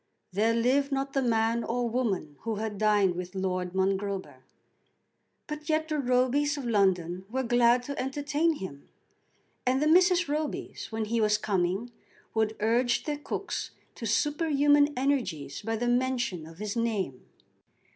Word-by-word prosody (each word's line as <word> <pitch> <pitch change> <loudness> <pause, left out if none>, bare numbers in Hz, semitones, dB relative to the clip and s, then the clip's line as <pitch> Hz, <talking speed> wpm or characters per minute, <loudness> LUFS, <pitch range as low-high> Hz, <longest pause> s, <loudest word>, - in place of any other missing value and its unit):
There 220 +4 +2
lived 265 +5 +2
not 275 0 -1
the 270 - +2
man 230 -1 +1
or 240 +1 -1
woman 210 - -1
who 225 -1 -3
had 210 -1 -4
dined 205 -3 +3
with 180 +1 -6
Lord 185 -1 -2
Mongrober. 195 0 -1 1.1
But 300 0 -7
yet 315 0 +1
the 305 -1 0
Robys 260 +3 +2
of 275 - -5
London 185 -5 +1
were 260 +3 -1
glad 240 0 +4
to 280 +3 -4
entertain 290 +5 0
him; 160 - -8 0.7
and 255 +1 +2
the 300 - +1
Mrs. 360 +2 +5
Robys, 300 -3 -3
when 220 0 -2
he 230 +1 0
was 210 -1 +3
coming, 195 +2 -1 0.4
would 220 0 +1
urge 240 +3 +2
their 295 -1 -3
cooks - - -4 0.2
to 230 - -5
superhuman 290 +3 +3
energies 215 - -1
by 225 +2 -2
the 240 +2 -1
mention 240 -9 0
of 165 0 -13
his 210 +2 -4
name. 210 - -2
235 Hz, 150 wpm, -28 LUFS, 200-275 Hz, 1.1 s, Mrs